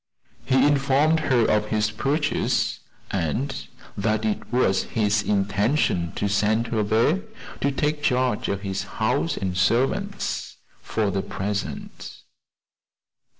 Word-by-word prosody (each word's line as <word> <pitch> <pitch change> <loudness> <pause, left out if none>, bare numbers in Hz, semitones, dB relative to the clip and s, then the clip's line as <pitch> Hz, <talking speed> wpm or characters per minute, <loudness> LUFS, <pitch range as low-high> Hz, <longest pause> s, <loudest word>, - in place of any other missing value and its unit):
He 130 0 +4
informed 145 +2 +3
her 125 -7 +2
of 105 0 +2
his 110 0 0
purchase, 145 +7 0 0.3
and 100 - -1 0.4
that 110 +1 0
it 110 - -2
was 120 -6 +2
his 105 -1 +1
intention 100 - +1
to 105 - -1
send 105 +3 +2
her 110 -2 0
there 115 - +2 0.4
to 140 - +1
take 150 +2 -1
charge 125 -4 +1
of 100 -1 -2
his 95 -2 -3 0.2
house 80 - 0
and 95 -2 -2
servants, 115 +8 0 0.2
for 105 -3 -1
the 95 0 -1
present. 100 +1 -5
110 Hz, 120 wpm, -24 LUFS, 100-135 Hz, 0.4 s, He